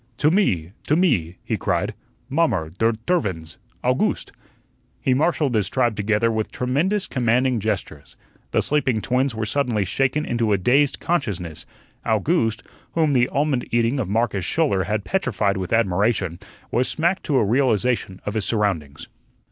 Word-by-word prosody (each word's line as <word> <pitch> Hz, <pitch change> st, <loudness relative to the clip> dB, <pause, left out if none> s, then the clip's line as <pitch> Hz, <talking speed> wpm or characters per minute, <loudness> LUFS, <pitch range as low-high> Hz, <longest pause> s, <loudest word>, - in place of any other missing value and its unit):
"To 150 Hz, +1 st, +3 dB
me, 95 Hz, -, +1 dB, 0.2 s
to 150 Hz, -, +3 dB
me," 115 Hz, -, +1 dB
he -, -, -2 dB
cried. -, -, -1 dB, 0.3 s
"Mommer, 135 Hz, -, 0 dB
der 115 Hz, +3 st, +2 dB
tervins, 95 Hz, -, -1 dB, 0.2 s
Owgooste." -, -, 0 dB, 0.7 s
He 130 Hz, -, +1 dB
marshalled 150 Hz, -1 st, +1 dB
his 105 Hz, -4 st, +1 dB
tribe 120 Hz, -4 st, +1 dB
together, 105 Hz, +2 st, +1 dB
with 110 Hz, -1 st, -2 dB
tremendous 160 Hz, +11 st, 0 dB
commanding 125 Hz, 0 st, +1 dB
gestures. 95 Hz, -8 st, -4 dB, 0.3 s
The -, -, +1 dB
sleeping 130 Hz, -7 st, +1 dB
twins 130 Hz, +1 st, 0 dB
were 110 Hz, 0 st, -2 dB
suddenly 115 Hz, -4 st, 0 dB
shaken 135 Hz, -, 0 dB
into 115 Hz, -3 st, 0 dB
a -, -, +3 dB
dazed 135 Hz, +9 st, +2 dB
consciousness; 100 Hz, -, -2 dB, 0.4 s
Owgooste, 115 Hz, -, +1 dB, 0.3 s
whom 160 Hz, -3 st, +2 dB
the 125 Hz, -1 st, +3 dB
almond 140 Hz, -3 st, 0 dB
eating 120 Hz, +3 st, +1 dB
of 105 Hz, -7 st, -2 dB
Marcus 110 Hz, -2 st, 0 dB
Schouler 100 Hz, -, +1 dB
had 105 Hz, +2 st, -2 dB
petrified 105 Hz, -, 0 dB
with 95 Hz, -1 st, -4 dB
admiration, 100 Hz, -4 st, +1 dB, 0.3 s
was 125 Hz, +2 st, +2 dB
smacked 170 Hz, +4 st, +1 dB
to 140 Hz, -, +1 dB
a 110 Hz, -, +3 dB
realization 120 Hz, -4 st, +1 dB
of 105 Hz, -, -2 dB
his 110 Hz, -3 st, -1 dB
surroundings. 95 Hz, -10 st, -1 dB
115 Hz, 150 wpm, -22 LUFS, 100-140 Hz, 0.7 s, To